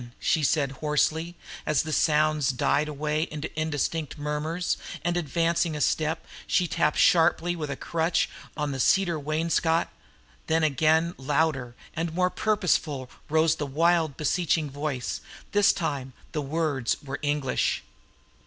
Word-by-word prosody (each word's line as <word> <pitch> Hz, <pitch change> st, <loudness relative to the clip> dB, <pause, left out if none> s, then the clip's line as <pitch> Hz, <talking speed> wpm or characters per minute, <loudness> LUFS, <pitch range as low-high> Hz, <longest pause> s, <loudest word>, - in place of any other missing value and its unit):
she 160 Hz, -, +2 dB
said 140 Hz, -1 st, +2 dB
hoarsely, 160 Hz, +3 st, +1 dB, 0.3 s
as 155 Hz, -3 st, +1 dB
the 155 Hz, -1 st, -4 dB
sounds 155 Hz, -2 st, +3 dB
died 140 Hz, +3 st, +1 dB
away 150 Hz, +2 st, -1 dB
into 150 Hz, 0 st, -4 dB
indistinct 155 Hz, 0 st, -2 dB
murmurs, 150 Hz, +4 st, -1 dB, 0.3 s
and 175 Hz, 0 st, 0 dB
advancing 170 Hz, 0 st, +1 dB
a -, -, -3 dB
step 160 Hz, +2 st, 0 dB, 0.2 s
she 180 Hz, -, +2 dB
tapped 150 Hz, -1 st, +1 dB
sharply 175 Hz, +1 st, +4 dB
with 155 Hz, -3 st, -4 dB
a 140 Hz, -, -2 dB
crutch 165 Hz, +4 st, 0 dB, 0.3 s
on 150 Hz, -1 st, -1 dB
the 135 Hz, -, -4 dB
cedar 175 Hz, +4 st, +3 dB
wainscot; 160 Hz, +2 st, +1 dB, 0.6 s
then 160 Hz, 0 st, +2 dB
again 160 Hz, +3 st, +3 dB
louder 135 Hz, -3 st, 0 dB, 0.2 s
and 165 Hz, 0 st, -2 dB
more 180 Hz, 0 st, +2 dB
purposeful 165 Hz, -11 st, 0 dB, 0.2 s
rose 160 Hz, +1 st, +3 dB
the 145 Hz, -, -3 dB
wild 160 Hz, 0 st, +2 dB
beseeching 160 Hz, -1 st, +1 dB
voice; 145 Hz, -3 st, -3 dB, 0.3 s
this 205 Hz, -1 st, +5 dB
time 135 Hz, -7 st, -3 dB, 0.2 s
the 150 Hz, -, -2 dB
words 145 Hz, -4 st, -1 dB
were 140 Hz, 0 st, -5 dB
English. 145 Hz, -3 st, 0 dB
155 Hz, 135 wpm, -26 LUFS, 145-165 Hz, 0.6 s, this